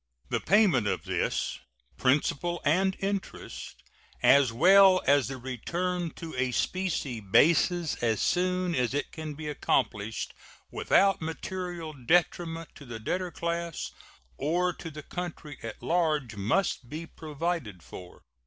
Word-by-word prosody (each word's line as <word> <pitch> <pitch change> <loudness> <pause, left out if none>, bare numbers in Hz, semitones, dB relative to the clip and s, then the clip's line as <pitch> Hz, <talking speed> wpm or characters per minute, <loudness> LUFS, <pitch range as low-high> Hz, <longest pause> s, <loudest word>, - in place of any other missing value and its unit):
The - - 0
payment 190 - +4
of - - -1
this, - - -1 0.4
principal 150 +5 +1
and 190 +6 +2
interest, 195 - -5 0.4
as 140 -3 +6
well 185 +8 +6
as 140 -4 +4
the 135 0 -5
return 170 +8 -2
to 165 -1 -7
a 130 0 +1
specie 160 - -1
basis 160 - +3
as 115 -3 +1
soon 180 0 +1
as 125 -2 0
it 145 - -2
can 155 -2 -6
be 155 +1 -6
accomplished 110 -6 -1 0.4
without 195 -3 +3
material 170 0 -5
detriment 165 +4 0
to 145 - -12
the 115 -2 -6
debtor 180 +11 -2
class 170 -1 -3 0.5
or 175 +5 +1
to 165 - -8
the 150 -1 -9
country 165 -5 -6
at 115 -1 -8
large, 155 -9 +1
must 120 - 0
be 155 +3 -5
provided 155 - -4
for. 90 +2 -11
160 Hz, 130 wpm, -28 LUFS, 130-180 Hz, 0.5 s, as